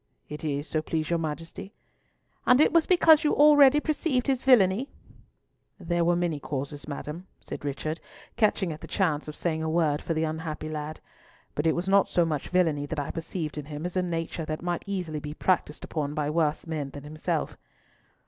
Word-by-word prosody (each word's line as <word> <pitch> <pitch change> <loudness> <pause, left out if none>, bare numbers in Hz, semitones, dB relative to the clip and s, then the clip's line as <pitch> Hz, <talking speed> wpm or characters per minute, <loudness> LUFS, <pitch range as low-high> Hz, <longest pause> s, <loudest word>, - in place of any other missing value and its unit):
"It 150 +1 -7
is, 145 0 -2
so 155 - -1
please 155 +1 -2
your 170 - +2
Majesty." 165 +5 -6 0.7
"And 250 +1 +6
it 305 - +5
was 335 -2 +4
because 325 -4 +6
you 300 - +2
already 290 -1 +7
perceived 295 -4 0
his 265 -3 +1
villainy?" 240 -1 +4 0.9
"There 175 0 0
were 175 +1 +3
many 170 -4 -1
causes, 145 +1 -5
Madam," 150 +5 -6
said - - -8
Richard, 145 +3 -3 0.4
catching 210 -6 +1
at 155 - -11
the - - -8
chance 160 -7 0
of 150 - -6
saying 160 -2 -1
a 160 - -1
word 155 -3 +1
for 165 - -2
the 160 - +1
unhappy 155 -1 -4
lad, 155 0 -5 0.5
"but 150 +2 0
it 160 - +3
was 175 +2 -2
not 195 0 +4
so 175 - +3
much 150 -4 -3
villainy 160 -6 +1
that 145 - -3
I 145 - -3
perceived 165 -2 -4
in 145 - -7
him 150 +2 -6
as 180 - -4
a 185 - +2
nature 165 -1 -3
that 155 +1 -4
might 175 -1 -2
be - - -4
easily 160 -6 -3
practised 170 -5 0
upon 150 -2 -3
by 150 -1 -1
worse 155 -2 0
men 155 -4 -3
than 140 0 -10
himself." 155 +1 -3
165 Hz, 195 wpm, -27 LUFS, 150-185 Hz, 0.9 s, already